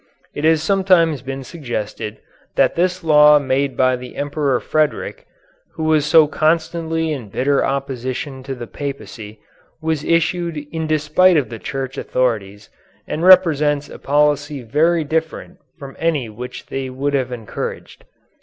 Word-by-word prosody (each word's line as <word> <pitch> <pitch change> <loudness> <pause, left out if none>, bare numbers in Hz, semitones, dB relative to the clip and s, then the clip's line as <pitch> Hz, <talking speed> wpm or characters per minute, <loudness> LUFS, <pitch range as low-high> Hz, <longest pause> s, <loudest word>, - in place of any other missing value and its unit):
It 145 - -3
has 160 -1 +3
sometimes 180 -5 +3
been 135 0 -6
suggested 115 -7 -5 0.4
that - - +3
this 180 +1 0
law 150 -1 +7
made 135 -1 -1
by 130 0 +3
the 125 0 -10
Emperor 145 -3 -1
Frederick, 155 - -1 0.5
who 160 - -5
was 155 -2 +2
so 160 0 +6
constantly 160 +1 0
in 125 -8 -7
bitter 140 +7 +1
opposition 135 0 -3
to 135 -1 -4
the 120 -1 -7
Papacy, 115 -6 -7 0.4
was 160 -2 -2
issued 170 0 0
in 160 -1 -3
despite 155 +4 +3
of 135 -7 0
the 115 - -7
Church 135 +1 -5
authorities 105 -5 -2 0.4
and 160 - -3
represents 155 -6 +5
a - - -10
policy 145 -1 +1
very 160 +8 +2
different 160 +4 -3 0.2
from 140 -3 -10
any 155 -8 0
which 120 +4 -8
they 135 -1 -4
would 140 +3 -2
have 130 -2 0
encouraged. 115 -4 -6
145 Hz, 145 wpm, -19 LUFS, 130-160 Hz, 0.5 s, law